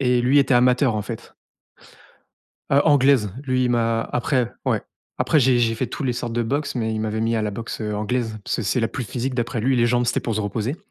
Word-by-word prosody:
Et 125 -2 +2
lui 130 +4 +4
était 135 -2 +3
amateur, 125 0 +3
en 105 - -2
fait. 110 +2 -8 1.4
Heu, 140 +1 +5
anglaise. 135 - +4
Lui 130 -1 +1
il 125 - +1
m'a 115 -1 +1
après, 125 -1 0
ouais, - - +1 0.4
après 155 - +3
j'ai 125 -1 +4
j'ai 115 -1 +2
fait 125 +3 -2
tous 150 - -5
les 125 - +1
sortes 120 -1 -4
de 120 0 0
boxe 140 +6 -2
mais 110 -2 -1
il 110 - -2
m'avait 110 0 -2
mis 115 +1 0
à 110 - 0
la 105 - -1
boxe, 115 +3 -6
heu, 105 -1 -2
anglaise. 110 +1 -2
Parce - - -1
que - - -3
c'est 110 +5 0
la 115 - +1
plus 125 - -5
physique 125 +5 -3
d'après 120 -2 -2
lui, 130 +2 +2
les 120 - +3
jambes 120 0 +1
c'était - - +1
pour 115 - -3
se 110 - -1
reposer. 110 +7 -2
120 Hz, 250 wpm, -22 LUFS, 110-130 Hz, 1.4 s, Heu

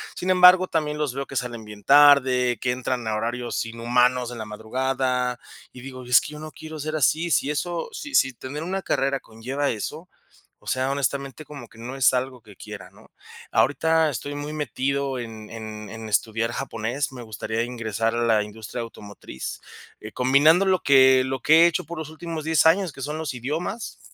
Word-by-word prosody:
Sin 185 +1 -1
embargo, 180 0 +7
también 150 -2 -1
los 145 -4 -2
veo 135 0 -4
que 135 - -9
salen 120 -3 -3
bien 105 -1 -11
tarde, 135 -4 +5
que 125 - 0
entran 125 -2 -3
a 110 - 0
horarios 120 +2 -2
inhumanos 125 +2 +1
en 120 - -8
la 110 - -5
madrugada, 125 +3 -2 0.3
y 125 - -12
digo: 130 -1 -9
"Es 125 0 +5
que - - -8
yo 150 - -9
no 155 0 -8
quiero 155 +2 -9
ser 155 +2 -3
así", 160 +4 +2
si 145 -2 +1
eso 170 +3 -3
si 290 0 -6
si 130 -1 +4
tener 140 +6 -7
una 190 +2 -3
carrera 135 -4 0
conlleva 130 +6 -3
eso, 150 - -5 0.5
o - - -25
sea, 130 +1 0
honestamente, 140 +1 -2
como 140 -6 -10
que 110 - -19
no 125 +4 -7
es 130 -1 +4
algo 125 -1 -2
que 105 -3 -16
quiera, 105 -2 -10
¿no? - - -20 0.4
Ahorita 160 +3 +3
estoy 145 +2 -5
muy 145 +1 -5
metido 140 -1 -2
en 110 -2 -8
en 110 -2 -7
en 110 0 -8
estudiar 115 +2 0
japonés, 130 +3 -3
me 125 - -8
gustaría 110 0 -4
ingresar 115 -2 -2
a 120 - 0
la 110 -2 +3
industria 110 +3 -7
automotriz. 100 - -8 0.4
Eh, 110 - -9
combinando 145 +9 +4
lo 185 -2 +3
que 130 -1 +6
lo 130 -2 -3
que 155 - +4
he - - +8
hecho 160 -2 -2
por 170 0 -7
los 155 -1 -6
últimos 160 -1 -6
10 160 0 +2
años, 175 +1 +4
que 135 - -11
son 150 +2 -4
los 145 -5 -4
idiomas, 155 - -4
130 Hz, 195 wpm, -24 LUFS, 115-150 Hz, 0.5 s, he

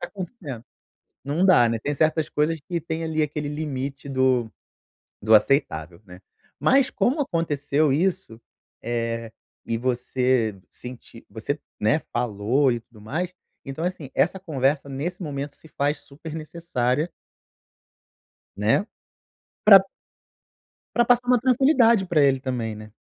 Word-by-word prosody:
tá - - -5
acontecendo?". 175 - -7 0.6
Não 150 +6 0
dá, 170 -11 +6
né. 115 0 -1
Tem 145 +6 -2
certas 155 +1 +1
coisas 155 +2 0
que 170 +3 -4
tem, 160 0 -4
ali, 160 -1 0
aquele 150 0 -2
limite 140 -2 -4
do 130 -4 +2 0.7
do 110 +1 +6
aceitável, 90 - +1
né. 90 -2 -13 0.4
Mas, 270 0 +4
como 275 +4 +1
aconteceu 150 - 0
isso, 170 -8 -1 0.4
eh, 115 -1 -3 0.3
e 115 - -1
você 125 -3 0
senti 125 -2 -11
você, 145 +7 -4 0.2
né, 110 +9 +2
falou 120 +4 +1
e 120 - -1
tudo 115 -1 -20
mais. 160 - -3 0.3
Então, 135 +4 -4
é - - +3
assim, 155 -7 -10
essa 190 +3 +2
conversa 140 -4 0
nesse 160 +8 -4
momento 145 -3 -4
se - - -16
faz 145 0 -1
super 150 +3 -10
necessária 155 -2 -2 1.5
né? 110 - +2 0.8
Pra 200 -2 +10 1.2
pra 240 - +4
passar 245 +1 +3
uma 250 -1 +4
tranquilidade 245 -5 +4
pra 165 -4 +2
ele 135 -1 +4
também, 125 -4 -3
né? 110 0 -11
145 Hz, 135 wpm, -24 LUFS, 120-165 Hz, 1.5 s, Pra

